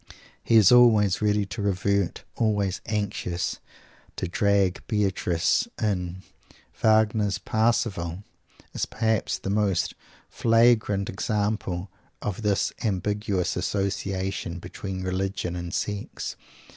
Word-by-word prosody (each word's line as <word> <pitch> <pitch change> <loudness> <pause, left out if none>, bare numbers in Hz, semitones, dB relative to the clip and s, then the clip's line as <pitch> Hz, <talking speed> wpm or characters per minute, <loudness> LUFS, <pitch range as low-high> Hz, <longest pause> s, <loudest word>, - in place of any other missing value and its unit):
He 115 - +2
is 105 -5 +7
always 110 -6 +5
ready 105 -1 +2
to 105 +3 -6
revert, 100 -1 0
always 105 -4 0
anxious 100 -5 -2 0.6
to 95 - -3
"drag 100 0 +2
Beatrice 100 - +1
in." 95 -4 -2 0.6
Wagner's 110 -2 +3
"Parsifal" 105 -5 0 0.5
is - - -2
perhaps 110 -1 0
the 95 - -4
most 100 -5 +1 0.3
flagrant 115 -4 +3
example 100 -3 -2 0.3
of 105 +1 -4
this 105 -2 +1
ambiguous 100 -3 -1
association 95 -1 -2
between 95 +2 -6
religion 95 -1 -2
and 85 -1 -5
sex. 105 +2 -3
100 Hz, 100 wpm, -26 LUFS, 95-105 Hz, 0.6 s, is